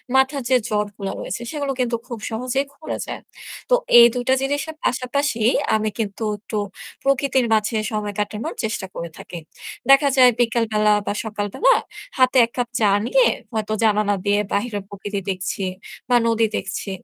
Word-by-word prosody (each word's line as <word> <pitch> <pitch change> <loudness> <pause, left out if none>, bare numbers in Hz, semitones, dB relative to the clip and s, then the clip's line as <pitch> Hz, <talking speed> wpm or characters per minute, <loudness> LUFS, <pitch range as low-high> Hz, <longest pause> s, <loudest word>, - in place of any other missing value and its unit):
মাথার 265 +1 +3
যে 260 - +5
জটগুলা 205 -2 -2
রয়েছে, 210 - -5
সেগুলো 285 -3 -2
কিন্তু 245 -2 +1
খুব 235 -3 -6
সহজেই 250 +4 -1
খুলে 310 - -6
যায়। - - -6 0.5
তো - - +6 0.2
এই 235 - +10
২ 245 - -2
টা - - +6
জিনিসের 290 +3 -2
পাশাপাশি 255 0 0 0.3
আমি 215 0 0
কিন্তু 210 0 -3
একটু 210 +1 -6 0.5
প্রকৃতির 270 -2 +2
মাঝে 215 +1 +1 0.2
সময় 210 -1 -3
কাটানোর 210 +1 -3
চেষ্টা 215 -3 -2
করে 170 - -5
থাকি। 175 - -8 0.5
দেখা 275 +1 +7
যায় 250 -1 +8
বিকালবেলা 225 -3 +2
বা - - -1
সকালবেলা 215 - +1 0.4
হাতে 255 0 +4
১ 230 - -16
কাপ 245 -1 -1
চা 215 -2 +4 0.2
নিয়ে - - +4 0.3
হয়তো 215 -1 -2
জানালা 210 -1 +3
দিয়ে 205 0 +3
বাহিরের 205 -1 -1
প্রকৃতি 200 0 -5
দেখছি 185 +1 -3 0.5
বা 245 - +4
নদী 230 0 +3
দেখছি। 190 +1 -4
230 Hz, 160 wpm, -21 LUFS, 210-260 Hz, 0.5 s, এই